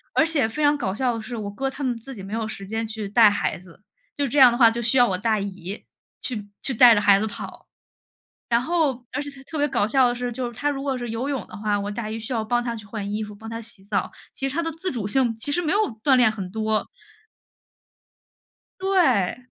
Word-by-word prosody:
而 315 - +5
且 295 -8 +1
非 300 +6 -3
常 290 0 +5
搞 195 -7 -2
笑 245 -1 0
的 225 - -5
是， 235 +2 -7
我 205 -2 -4
哥 270 +6 -2
他 275 +1 -7
们 250 -2 0
自 260 +3 -10
己 195 - -9
没 200 +2 -7
有 225 -1 -1
时 195 -2 -7
间 225 +2 -2
去 220 -2 -5
带 220 0 +7
孩 205 -3 -1
子， 185 +2 -18 0.3
就 285 -1 +1
这 280 +4 +1
样 250 -2 +9
的 240 - -1
话， 230 -3 +7
就 235 +1 -3
需 235 +3 +1
要 245 -1 +6
我 185 - 0
大 215 +1 +1
姨， 195 0 -6 0.4
去 210 -5 -4
去 270 - +1
带 235 0 +8
着 205 - +2
孩 200 -1 +6
子 220 - -1
跑。 - - -8 0.8
然 235 0 +3
后 275 -5 0
而 285 - -2
且 290 - -4
她 270 -1 -14
特 315 +3 -7
别 290 0 +2
搞 240 -6 +1
笑 260 +1 +4
的 240 - -1
是， 245 0 -3
就 245 +1 -3
是 240 - -8
她 290 - 0
如 275 -1 -3
果 270 -2 -1
是 240 -2 -5
游 230 +5 -3
泳 265 -8 -2
的 - - -10
话， 210 -1 0
我 205 +1 -3
大 215 0 -4
姨 220 - -4
需 225 +4 -7
要 225 -2 0
帮 240 +2 +1
她 235 -1 -2
去 215 -2 -9
换 205 -1 -5
衣 215 - -2
服、 210 -1 -8
帮 220 +2 -9
她 230 0 -5
洗 215 -3 -11
澡， 200 - -1 0.2
其 270 - -3
实 280 - -6
她 335 - 0
的 330 - -2
自 330 +4 -4
主 225 -6 -3
性 240 0 +1
其 285 +6 -2
实 350 - +1
没 325 +2 0
有 415 - +3 0.2
锻 270 -2 +5
炼 245 -3 +5
很 195 -4 -6
多。 220 0 -1 1.9
对， 255 - +2
235 Hz, 280 characters per minute, -24 LUFS, 215-270 Hz, 1.9 s, 样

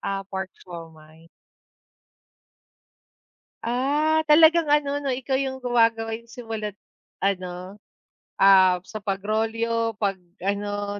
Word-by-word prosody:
Ah, 195 0 -3
pork 190 -1 -5 0.2
siomai. 165 -2 -12 2.4
Ah, 290 +6 +1
talagang 315 +1 +5
ano 290 -1 +1
'no, 275 - -1
ikaw 265 +1 -2
yung 265 0 -2
gumagawa 230 -2 +1
yung 235 +1 -13
simula't 220 -4 -6 0.4
ano, 185 -1 -3 0.6
ah, 190 -2 +6
sa 215 - -7
pagrolyo, 225 +3 -1
'pag 200 -2 0 0.3
ano 205 +1 -2
225 Hz, 100 wpm, -24 LUFS, 195-255 Hz, 2.4 s, ah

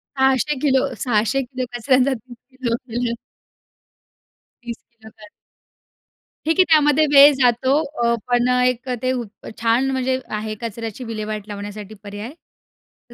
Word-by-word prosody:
600 265 +2 +2
kilo, 270 -2 +1
600 240 +2 +1
kilo 255 0 -5
कचऱ्याचा 255 +2 +2
30 240 0 -11 0.2
kilo 235 -3 0
केलं. 240 -1 -3 1.5
30 235 -1 -6
kilo 220 -2 -16
कच 210 -1 -13 1.2
ठीक 325 +2 +1
आहे, - - +9
त्यामध्ये 305 -1 +5
वेळ 285 +1 +9
जातो 250 +2 +3 0.3
अ, 235 - +3
पण 245 0 +2 0.2
एक 250 0 0
अ, - - 0
ते 255 - 0
ऊत 245 -3 -3 0.3
छान 235 +4 +2
म्हणजे 260 0 0 0.2
आहे, 215 0 -4
कचऱ्याची 230 +1 -5
विल्हेवाट 215 -2 -5
लावण्यासाठी 205 0 -7
पर्याय. 205 +5 -7 0.8
तर - - -14
245 Hz, 135 wpm, -21 LUFS, 225-265 Hz, 1.5 s, आहे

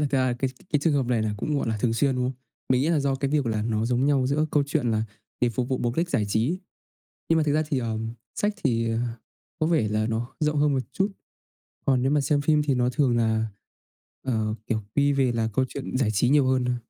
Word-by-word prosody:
thực - - -6
ra 130 - +2
là 125 - +1
cái 135 0 0 0.2
cái 150 - +4
trường 160 0 +2
hợp 135 -4 +1
này 120 -3 +1
là 105 -1 -1
cũng, 145 +7 -1
gọi 115 - -2
là, 110 - 0
thường 115 -2 +2
xuyên, 135 +3 +2
đúng 125 - 0
không? 130 - -1 0.4
Mình 130 0 +3
nghĩ 150 - +1
là 160 -3 +2
do 140 -1 +1
cái 135 +1 -2
việc 145 -4 +1
là 110 -2 0
nó 110 -1 0
giống 125 +2 +1
nhau 135 -3 +3
giữa 145 +3 +1
câu 145 - +3
chuyện 140 -5 0
là 110 -1 +1 0.4
để 120 - +3
phục 120 +2 -2
vụ 130 - 0
mục 120 0 -1
đích 170 +1 0
giải 105 - +1
trí. 120 - +1 0.7
Nhưng 165 - +4
mà 160 - +3
thực 150 -1 +1
ra 155 - +3
thì, 140 - +1
ờm, 115 -1 -3 0.2
sách 205 0 0
thì 115 -4 +1 0.7
có 155 - +2
vẻ 155 -11 +2
là 110 +1 0
nó 115 +1 -2
rộng 150 -1 +1
hơn 145 -1 +3
một 135 - +1
chút. 195 +9 0 0.8
Còn 130 -2 +3
nếu 135 - +2
mà 145 0 +3
xem 145 +1 +1
phim 150 +1 +3
thì 140 -3 +1
nó 125 0 +2
thường 125 -3 +2
là, 110 -1 +1 0.8
ờ, 110 -4 -1
kiểu, 110 -2 0
quy 145 0 +3
về 135 -3 +2
là 115 -1 0
câu 130 - +2
chuyện 135 -1 -5
giải 130 -5 +2
trí 110 +3 +2
nhiều 140 0 +4
hơn 130 -1 +2
thôi. 125 0 0
130 Hz, 265 wpm, -25 LUFS, 115-145 Hz, 0.8 s, cái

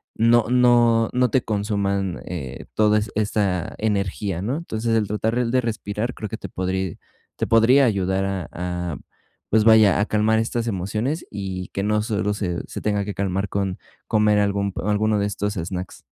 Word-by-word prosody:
no 115 0 +4
no 120 -2 +4
no 125 -1 +2
te 130 - +3
consuman, 100 -3 -1
eh, 75 -8 -6
todas 105 -1 +3
esta 100 -4 0
energía, 100 -3 -1
¿no?, 130 +8 -1
entonces, 115 -8 -2
el 105 -3 +1
tratar 110 +3 0
de 130 +1 +2
respirar 110 +1 -3
creo 105 -4 -6
que 110 - -5
te 100 - -8
podri 95 -1 -3 0.4
te - - -1
podría 125 +5 +5
ayudar 95 -3 0
a 95 -4 -3
a, 90 -2 -4 0.5
pues 110 0 +4
vaya, 110 -3 +6
a 105 - +2
calmar 110 +1 +2
estas 115 +1 -1
emociones 110 - -2
y 95 -2 -5
que 100 - -2
no 105 +1 +1
solo 105 -2 -1
se 90 -4 -2
se - - -6
tenga 105 -1 0
que 105 - -4
calmar 95 0 -1
con 95 -2 -2 0.3
comer 105 -1 +3
algún 100 -1 0
alguno 105 +1 +1
de 100 - +1
estos 105 +1 -3
snacks. 90 +1 -5
105 Hz, 170 wpm, -22 LUFS, 95-110 Hz, 0.5 s, vaya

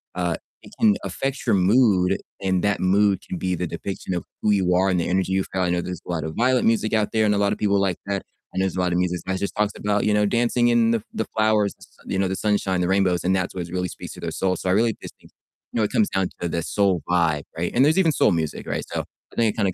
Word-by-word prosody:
uh, 90 -2 0 0.3
it - - -15
can 105 -2 +5
affect 135 +8 -3
your - - +4
mood, 95 -1 +3 0.2
and 95 -2 0
that 100 -1 +1
mood 100 +1 +3
can 90 - -4
be 90 -1 -1
the 90 - -2
depiction 95 +3 -5
of 85 - -2 0.2
who 105 - +3
you 95 -3 +2
are 95 +2 +3
and 90 -2 +1
the - - -1
energy 95 +1 0
you 95 0 +2
feel. 95 - -1
I 90 - +1
know 90 0 +1
there's 90 -2 -6
a - - -5
lot 85 -2 -2
of 80 0 -5
violent 125 +2 +2
music 115 -1 +1
out 110 -1 +1
there, 110 -1 +3
and 105 - +3
a 100 - +1
lot 100 0 +2
of - - -5
people 100 -1 +2
like 95 -3 0
that. 100 -1 -2 0.3
I - - -7
know - - +2
there's 95 - -2
a - - -2
lot 90 -1 +1
of 90 - +1
music 90 -2 -1
that 95 0 -2
just 100 - -3
talks 105 -1 0
about, 105 0 0
you 105 - +2
know, 105 0 +3
dancing 120 +2 +2
in 120 -1 +3
the 115 -2 +1
the 110 - -2
flowers, 110 -2 +2
the - - -38
s - - -14 0.2
you 95 - -2
know, 95 - +2
the 95 - -2
sunshine, 100 -3 0
the 90 - +1
rainbows, 95 -2 +2
and 95 +1 +2
that's 95 -1 -2
what 90 -2 -4
really 90 +1 -2
speaks - - -9
to - - -11
their - - -4
soul. 95 -1 0
So, 90 - -3
I - - +3
really 115 +2 +2
just - - -10
think, - - -20 0.4
you - - -4
know, 110 - +2
it 105 - -1
comes 215 - +2
down 95 -1 0
to 85 - -1
the 85 0 -2
soul 95 -3 +1
vibe, 85 -4 +2
right? 85 +1 -1
And 130 +3 +5
there's 160 +5 +3
even 165 -4 +4
soul - - +3
music, 80 -3 -2
right? - - -2
So - - -1 0.3
I - - -15
think 115 -3 +2
it - - -20
kind 105 -3 +2
of 95 - -1
95 Hz, 305 wpm, -23 LUFS, 90-105 Hz, 0.4 s, can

